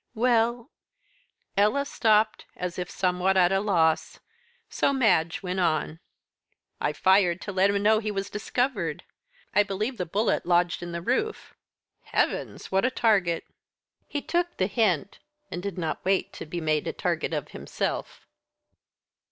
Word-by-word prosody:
"Well 235 +2 +1 0.4
" - - -37 0.3
Ella 215 +8 +3
stopped, 215 -4 +2
as 180 0 -4
if 180 - -4
somewhat 185 +1 +1
at 180 -1 +5
a 195 - +3
loss. 170 -6 +1 0.5
So - - +1
Madge 185 -11 +2
went 185 0 -2
on. 160 -2 0 0.8
"I 150 - 0
fired 185 +2 +3
to 205 - -5
let 195 +1 +3
him 200 0 0
know 215 +1 +5
he 215 -1 -3
was 200 -1 -3
discovered. 210 - -2 0.5
I 205 - +5
believe 210 +5 -2
the 180 - -2
bullet 210 +6 +1
lodged 175 -1 +2
in 175 0 -6
the 170 0 -5
roof." 415 - -1 0.5
"Heavens! - - -2
what 190 0 +2
a 255 - +3
target." 200 -9 +2 0.6
"He 290 - -4
took 345 0 -1
the 185 - +2
hint, 195 -4 0 0.3
and 175 - -4
did 200 -1 -5
not 165 -3 -3
wait 190 0 0
to - - -8
be 175 +3 -4
made 155 -2 0
a - - -2
target - - -1
of - - -3
himself." - - -4
195 Hz, 155 wpm, -26 LUFS, 175-220 Hz, 0.8 s, at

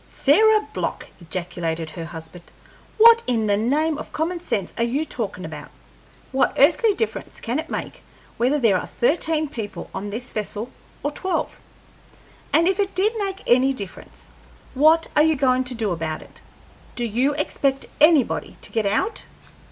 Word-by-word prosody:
"Sarah 430 +9 +4
Block!" - - -3
ejaculated 170 -2 -4
her 165 -2 -6
husband, 165 +1 -10 0.5
"what 460 +1 +8
in 230 -3 +1
the 205 -1 +2
name 295 +8 +1
of - - -8
common 340 +3 -2
sense 205 - -2
are 230 - 0
you 270 +7 0
talkin' - - -5
about? - - -8 0.6
What 270 0 +1
earthly 390 - +4
difference 450 - -3
can 245 +5 -2
it 320 - -6
make - - -5 0.4
whether 255 +5 +2
there 220 -9 +3
are - - -7
thirteen 310 +3 +1
people 225 -8 -7
on 205 - -4
this 235 +5 -6
vessel 215 +2 -4 0.3
or 290 - 0
twelve? 375 +5 -2 0.9
And 335 +1 +4
if 385 +1 +1
it 395 -2 0
did 410 +5 +2
make 390 -1 -3
any 255 +3 +4
difference, 200 -7 -10 0.4
what 315 +4 +5
are 295 - +6
you 315 0 +4
goin' 260 -2 +2
to 250 0 -3
do 220 -4 -1
about 160 -2 -3
it? - - -16 0.5
Do 240 - -1
you 250 +6 +1
expect 275 -2 -1 0.2
anybody 305 -4 +4
to - - -8
get 220 -3 0
out?" 220 - 0
265 Hz, 165 wpm, -22 LUFS, 210-320 Hz, 0.9 s, what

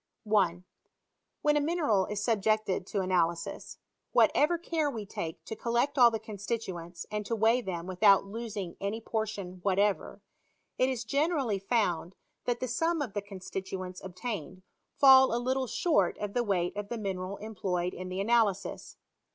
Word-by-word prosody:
1. 185 -5 +1 0.8
When 295 0 +4
a - - +2
mineral 290 - +1
is 210 -1 -3
subjected 215 -4 +1
to 200 - -1
analysis, 170 -3 -1 0.4
what - - +6
ever 325 +4 +3
care 330 -3 -1
we 225 -6 -5
take 165 -4 -6
to 220 - -5
collect 235 +5 0
all 240 -1 +9
the 225 - -2
constituents, 200 -5 -5
and 210 0 -2
to 230 - 0
weigh 225 +3 +3
them 175 -6 -4
without 195 +2 +4
losing 205 -4 -5
any 200 +3 -2
portion 215 -5 -4
what 195 0 +1
ever, 205 0 +1 0.6
it 255 - +4
is 250 -3 -2
generally 275 - 0
found 190 -4 0 0.3
that 240 -1 0
the 255 - -2
sum 325 +7 0
of 260 -9 -3
the 205 - -2
con 200 -1 -10
stituents 185 -1 -6
obtained 185 - -6 0.3
fall 265 -3 +7
a - - +1
little 260 +2 0
short 205 - +1
of 205 -1 -4
the 245 - +2
weight 180 -5 0
of 205 0 -5
the 235 - -3
mineral 195 -2 -4
employed 185 -4 -2
in 185 0 -6
the 185 +1 -4
analysis. 205 -2 0
210 Hz, 165 wpm, -30 LUFS, 185-240 Hz, 0.8 s, all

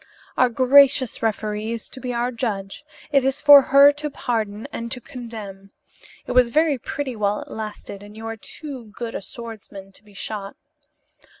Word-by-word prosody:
Our 255 - +4
gracious 260 +1 +4
referee 215 0 -2
is 230 - -6
to 260 - -11
be 255 -1 -4
our 240 +1 -1
judge. 215 -2 -4 0.3
It 275 -3 +4
is 270 +1 0
for 290 -1 +9
her 280 +2 +7
to 295 +1 -5
pardon 220 -6 -3
and 230 0 -5
to 255 - -1
condemn. 220 -6 -9 0.6
It - - -5
was 250 -1 +4
very 305 +1 +2
pretty 270 0 -4
while 205 -1 0
it - - -16
lasted 210 -2 -7
and 205 +1 -13
you 225 - -8
are 225 0 -4
too 265 +3 -8
good 235 -1 -5
a - - -4
swordsman 210 -3 -9
to 195 - -13
be 205 -1 -20
shot. 200 -1 -6
230 Hz, 180 wpm, -22 LUFS, 210-265 Hz, 0.6 s, for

